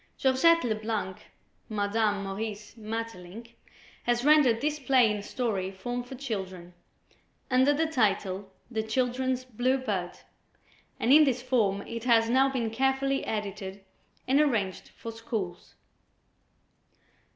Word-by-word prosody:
Georgette 305 Hz, +6 st, +4 dB
Leblanc 215 Hz, -4 st, -2 dB, 0.5 s
(Madame 205 Hz, -1 st, 0 dB
Maurice 210 Hz, +2 st, -5 dB
Maeterlinck), 225 Hz, -1 st, -7 dB, 0.5 s
has 240 Hz, +1 st, 0 dB
rendered 295 Hz, -7 st, +5 dB
this 300 Hz, +2 st, -1 dB
play 255 Hz, -4 st, +4 dB
in 210 Hz, -1 st, -3 dB
story 205 Hz, -4 st, -2 dB
form 245 Hz, +6 st, -4 dB
for 245 Hz, +2 st, -9 dB
children, 190 Hz, -9 st, -5 dB, 0.8 s
under 260 Hz, +3 st, +5 dB
the 305 Hz, +3 st, +1 dB
title 200 Hz, -8 st, 0 dB, 0.2 s
"The 220 Hz, -2 st, 0 dB
Children's 255 Hz, +3 st, -1 dB
Blue 255 Hz, +2 st, 0 dB
Bird," 195 Hz, -9 st, -3 dB, 0.9 s
and 250 Hz, -, +4 dB
in 305 Hz, +1 st, +9 dB
this 255 Hz, -4 st, 0 dB
form 210 Hz, -6 st, +1 dB
it 230 Hz, 0 st, -6 dB
has 230 Hz, -2 st, +4 dB
now 265 Hz, +2 st, +4 dB
been 240 Hz, -4 st, -2 dB
carefully 270 Hz, +3 st, +1 dB
edited 200 Hz, -2 st, -5 dB, 0.4 s
and 275 Hz, +3 st, +4 dB
arranged 215 Hz, -10 st, 0 dB
for 230 Hz, -, -8 dB
schools. 220 Hz, -6 st, -5 dB
230 Hz, 120 wpm, -28 LUFS, 205-260 Hz, 0.9 s, in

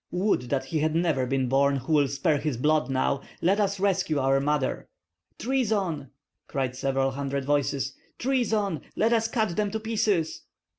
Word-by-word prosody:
Would 180 Hz, -, 0 dB
that 135 Hz, 0 st, 0 dB
he 155 Hz, +4 st, -2 dB
had 155 Hz, +1 st, 0 dB
never 160 Hz, -7 st, +1 dB
been 130 Hz, 0 st, 0 dB
born 140 Hz, +2 st, +3 dB
who 135 Hz, +4 st, -2 dB
will 145 Hz, -2 st, +4 dB
spare 140 Hz, +2 st, +1 dB
his 145 Hz, -5 st, -2 dB
blood 150 Hz, 0 st, +2 dB
now! 135 Hz, +1 st, 0 dB, 0.2 s
Let 195 Hz, +5 st, +2 dB
us 200 Hz, -1 st, 0 dB
rescue 185 Hz, -5 st, +1 dB
our 135 Hz, 0 st, +3 dB
mother!" 145 Hz, -1 st, -1 dB, 0.5 s
"Treason!" 205 Hz, -, -1 dB, 0.4 s
cried 130 Hz, -2 st, -2 dB
several 135 Hz, 0 st, 0 dB
hundred 140 Hz, 0 st, -3 dB
voices, 140 Hz, -1 st, 0 dB, 0.2 s
"treason! 220 Hz, -, 0 dB
Let 225 Hz, +2 st, +2 dB
us 225 Hz, -1 st, +2 dB
cut 220 Hz, -6 st, 0 dB
them 210 Hz, -1 st, 0 dB
to 220 Hz, -, -3 dB
pieces." 210 Hz, -7 st, 0 dB
150 Hz, 165 wpm, -26 LUFS, 135-200 Hz, 0.5 s, will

